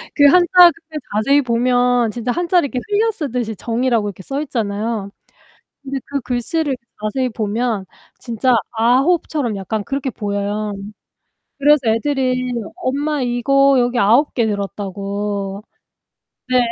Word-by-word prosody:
그 285 - +5
한자 350 +4 +5 0.2
그게 320 -1 -11 0.2
자세히 275 +8 +3
보면 245 -1 +2
진짜 240 +1 -3
한자를 350 0 +1
이렇게 255 - -2
흘려쓰듯이 300 - -1
정이라고 230 0 0
이렇게 190 -1 -10
써 275 +6 -3
있잖아요. 220 -5 -3 0.7
근데 275 0 -4
그 280 0 -3
글씨를 265 +5 -1 0.3
자세히 235 +5 -1
보면 220 -1 -2 0.3
진짜 240 +1 0 0.2
9 255 +9 +2
처럼 250 -9 -2
약간 205 +2 -3
그렇게 275 +1 -3
보여요. 205 0 -3 0.9
그래서 295 +1 +5
애들이 255 +1 0 0.2
엄마 285 +2 -1
이거 275 +3 +3
여기 245 0 +1
9 240 +8 +3
개 235 -3 +1
들었다고. 200 0 -4 0.9
네. 255 0 +3
245 Hz, 275 characters per minute, -19 LUFS, 215-275 Hz, 0.9 s, 그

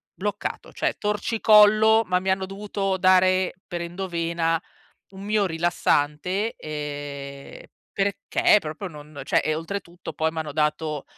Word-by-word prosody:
Bloccato, 205 +2 -4
cioè, - - -1
torcicollo, 215 +1 +5
ma 180 -1 +1
mi 190 +1 -3
hanno 190 0 +1
dovuto 195 0 -3
dare 185 0 +4
per 175 -2 -4
endovena 170 -2 -1 0.5
un 195 0 -11
miorilassante, 180 -1 0
ehm, 145 -2 -7 0.3
perché 200 +1 +2
proprio 155 +5 -6
non 150 -2 -11
cioè, 155 - +1
oltretutto, 170 +2 -6
poi 160 0 0
m'hanno 160 -2 -5
dato, 150 -1 -1
180 Hz, 115 wpm, -24 LUFS, 155-195 Hz, 0.5 s, torcicollo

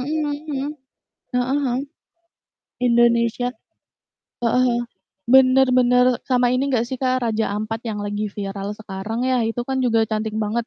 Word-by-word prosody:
mhm 295 +2 -1 0.2
mhm. 275 0 -2 0.7
Heeh 255 +3 +1
heeh. 245 -1 0 1.1
Indonesia. 235 0 +3
Heeh - - -34
heeh. - - -50 1.6
bener 265 +1 +5
bener, 250 0 +4
sama 250 -1 +3
ini 265 +2 +1
enggak 240 -3 +1
sih, 260 -1 -5
Kak, 255 -1 +1
Raja 225 -1 0
Ampat, 215 +1 -3
yang 215 - -3
lagi 205 +1 -2
viral 200 0 -5
sekarang 215 +3 -4
ya, 255 -1 +2
itu 235 +2 -3
kan 265 +1 -2
juga 230 -3 +2
cantik 215 0 -3
banget, 220 +2 -1
240 Hz, 145 wpm, -21 LUFS, 220-255 Hz, 1.6 s, bener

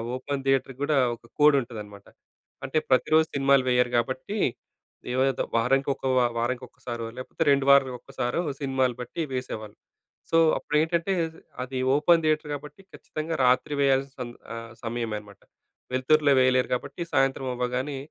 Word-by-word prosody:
Open 140 +2 -4
థియేటర్‌కి 135 -1 0
గుడా 150 0 +2 0.2
ఒక 115 - -21
కోడ్ 150 -1 +6
ఉంటదనమాట. 105 -4 -9 0.6
అంటే 155 - -2
ప్రతిరోజు 155 +5 +4
సినిమాలు 140 -1 +4
వేయరు 125 0 +2
గాబట్టి, 130 - -1 0.8
ఏదో 130 +1 +1
వారానికి 135 +4 +2
ఒక - - -29 0.4
వారానికి 120 +2 -1
ఒకసారో 120 -2 -6
లేకపోతే 130 +5 -3
రెండు 140 -1 +2
వారాలకొక్కసారో, 130 +1 +1 0.2
సినిమాలు 130 -2 0
బట్టి 125 +7 -5
వేసేవాళ్ళు. 110 -4 -5 0.6
సో 165 - +4 0.2
అప్పుడు - - -4
ఏంటంటే 170 +3 0 0.5
అది 130 +1 -5 0.2
ఓపెన్ 165 +3 +4
థియేటర్ 155 -1 +1
కాబట్టి 150 +6 -8
ఖచ్చితంగా 155 +1 -5
రాత్రి 125 +3 +2
వేయాల్సిన 135 -1 +1 0.3
ఆ - - -5 0.3
సమయమే 115 -2 -3
అన్నమాట. 100 -1 -16 0.5
వెలుతురులో 145 +2 +3
వేయలేరు 130 0 +3
కాబట్టి 140 +5 -4
సాయంత్రం 135 0 +1
అవ్వగానే, 125 +3 -2
130 Hz, 135 wpm, -26 LUFS, 125-145 Hz, 0.8 s, కోడ్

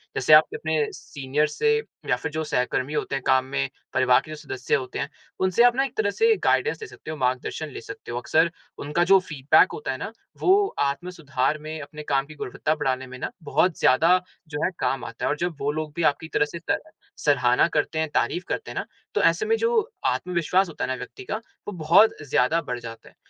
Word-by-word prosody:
जैसे 155 - +4
आप 155 +1 +10
अपने 155 -1 0
सीनियर्स 150 -2 -2
से 445 0 +4 0.3
या - - +4
फिर 145 - -5
जो 160 +1 -2
सहकर्मी 140 -1 -1
होते 145 - -1
हैं 135 - -3
काम 130 -1 +4
में, 70 - -2 0.2
परिवार 125 -1 +4
के 155 - -10
जो - - -5
सदस्य 130 -4 -2
होते 130 -1 -4
हैं, 140 - -2 0.3
उनसे 190 +5 +3
आप 245 0 +5
ना 270 - +2
एक 265 -1 -8
तरह 210 -2 +2
से 450 - +3
गाइडेंस 455 - +2
ले 440 - -6
सकते 155 - -9
हो, 155 - -5
मार्गदर्शन 130 +4 -1
ले - - -8
सकते 115 - -9
हो। 120 - -3
अक्सर 160 +6 +2 0.3
उनका 150 +4 0
जो 190 +2 +6
फ़ीडबैक 150 -6 +3
होता 455 - -4
है - - -4
ना, - - -5 0.3
वो 395 +2 +4
आत्म 140 +6 -1
सुधार 150 -5 -1
में, 155 +1 -6
अपने 150 +1 -9
काम 135 -2 +1
की 155 +2 -12
गुणवत्ता 155 +3 -2
बढ़ाने 130 -3 -1
में 130 0 -9
ना, - - -3
बहुत 170 +3 +1
ज़्यादा 165 +7 +5 0.3
जो 145 -1 -3
है, - - 0
काम 135 -3 -1
आता 115 - -5
है - - +1
और 150 - 0
जब 175 0 -2
वो 140 +1 0
लोग 155 0 -4
भी 170 - -1
आपकी 160 +3 -10
तरह 150 - +3
से 170 +3 -8
स - - +3 0.4
सराहना 130 -3 +3
करते 160 +2 0
हैं, 160 - 0
तारीफ 180 - 0
करते 450 - -3
हैं - - -9
ना, - - -2 0.3
तो - - +3
ऐसे 425 - +3
में 450 +1 +3
जो 465 0 +1
आत्मविश्वास 180 +2 +1
होता 160 - -5
है - - 0
ना 130 - 0
व्यक्ति 125 -1 -9
का, 170 - -3 0.3
वो - - -3
बहुत 170 +8 +5
ज़्यादा 155 +9 +3
बढ़ 125 -4 -4
जाता 115 -1 -10
है। - - -26
155 Hz, 230 wpm, -25 LUFS, 135-175 Hz, 0.4 s, आप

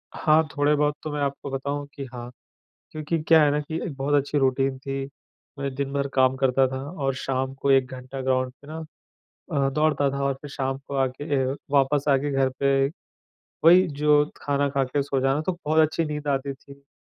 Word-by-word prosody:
हाँ, 155 0 +3
थोड़े-बहुत 145 0 +2
तो 155 - -4
मैं 150 - -3
आपको 140 0 -3
बताऊँ 140 +2 -3
कि 140 - -5
हाँ, 120 -1 -7 0.6
क्योंकि 155 +2 -2
क्या 160 0 +6
है 145 - +4
ना 145 - +1
की 155 +2 -5
एक 160 - -5
बहुत 140 +2 -1
अच्छी 145 +1 +1
रूटीन 135 0 +1
थी, 135 0 -4 0.5
मैं 140 -1 -3
दिन-भर 140 +1 -2
काम 130 0 +3
करता 135 0 +3
था 130 +1 -4 0.3
और 135 -1 +1
शाम 130 0 -2
को 140 +1 -1
1 135 -1 +5
घंटा 130 +1 -7
ग्राउंड 130 -1 0
पे - - -15
ना 160 +1 -6 0.8
अ, 140 -2 +2
दौड़ता 150 0 +2
था 140 0 -2
और 140 0 +1
फिर 145 - -8
शाम 135 -1 -2
को 140 - -5
आके 135 +1 -1
ए 135 -1 +1 0.3
वापस 140 0 +2
आके 140 +1 +2
घर 135 -1 +2
पे 135 0 +3 0.8
वही 180 +3 +7
जो 150 -1 +3
खाना 140 0 0
खाके 135 0 0
सो 135 -1 -1
जाना, 135 +3 +1
तो 170 - -1
बहुत 155 +1 +2
अच्छी 160 +1 +1
नींद 150 -1 -5
आती 140 0 -1
थी। 140 +1 -15
अ, 140 - -27
140 Hz, 200 wpm, -25 LUFS, 135-145 Hz, 0.8 s, वही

